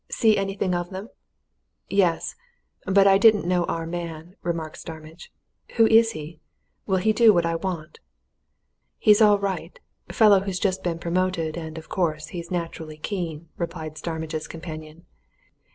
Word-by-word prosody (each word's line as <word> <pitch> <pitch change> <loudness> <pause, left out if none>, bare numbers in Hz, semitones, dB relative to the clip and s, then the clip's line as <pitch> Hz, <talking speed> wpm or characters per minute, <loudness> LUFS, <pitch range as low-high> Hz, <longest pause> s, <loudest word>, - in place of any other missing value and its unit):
See 220 -2 +3
anything 195 -1 -1
of 175 0 -2
them?" 195 +4 -7 0.8
"Yes 185 -4 +1 0.5
but 195 +1 +5
I 195 0 +6
didn't 215 -3 +5
know 175 -1 +1
our 165 0 -3
man," 170 0 -6
remarked 165 -2 -4
Starmidge. 160 +1 -10 0.4
"Who 225 - +6
is 225 +1 +5
he? 155 -1 -8 0.5
Will 190 -2 +2
he 215 +4 +2
do 230 -1 +6
what 175 -4 +2
I 165 - 0
want?" 165 -2 -4 1.0
"He's 210 0 +5
all 210 -1 +6
right 200 - -4 0.3
fellow 210 -4 +6
who's 190 -1 -3
just 190 -1 0
been 170 -2 -1
promoted, 170 -2 -1
and, 160 -1 -6
of 160 - -9
course, 155 -4 -1
he's 170 0 -7
naturally 165 -3 -5
keen," 165 -2 -5
replied 160 -2 -5
Starmidge's 160 -1 -4
companion. 160 0 -9
175 Hz, 150 wpm, -24 LUFS, 160-195 Hz, 1.0 s, I